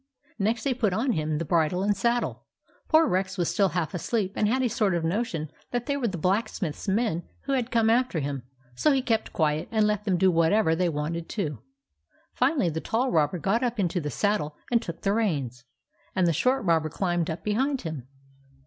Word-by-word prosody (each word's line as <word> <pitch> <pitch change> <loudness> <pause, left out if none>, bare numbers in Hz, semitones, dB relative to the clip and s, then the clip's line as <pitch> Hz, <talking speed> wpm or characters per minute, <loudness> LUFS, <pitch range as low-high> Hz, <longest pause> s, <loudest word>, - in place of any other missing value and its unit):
Next 220 +3 0
they 275 - +1
put 220 -6 0
on 245 +6 +1
him 155 -5 -1
the 165 - -2
bridle 170 +3 +1
and 205 0 +2
saddle. 235 +5 -1 0.4
Poor 320 +1 +5
Rex 190 -5 -1
was 175 -2 0
still 195 -2 +3
half 165 -2 -2
asleep, 195 +2 -1
and 210 - +2
had 260 +4 +1
a - - +3
sort 205 -4 +1
of 170 - -1
notion 165 -4 -2 0.2
that 245 -1 -2
they 280 - 0
were 265 -4 0
the 190 -4 -3
blacksmiths 190 -1 -1
men 200 -4 +1 0.2
who 275 - -2
had 250 -3 0
come 230 -3 +2
after 235 -5 +2
him; 140 -2 -3 0.3
so 300 - +2
he 265 -1 +1
kept 225 -3 0
quiet 155 -1 0
and 220 -2 +2
let 210 -1 0
them 190 -4 +2
do 190 +1 +4
whatever 165 +1 +3
they 180 +1 +1
wanted 160 +2 -3
to. 150 - -3 0.7
Finally, 260 - +2
the 160 +1 -3
tall 250 +4 0
robber 155 +2 +2
got 200 +7 +1
up 240 -3 -1
into 180 -2 0
the 150 - -3
saddle 155 -6 0 0.2
and 235 -1 +3
took 170 -7 -7
the 195 - +2
reins, 140 - -1 0.5
and 185 -2 +3
the 170 - +3
short 255 - +1
robber 160 -3 +2
climbed 175 0 -1
up 160 - -4
behind 260 +6 0
him. 155 -7 -6
190 Hz, 210 wpm, -26 LUFS, 165-230 Hz, 0.7 s, Poor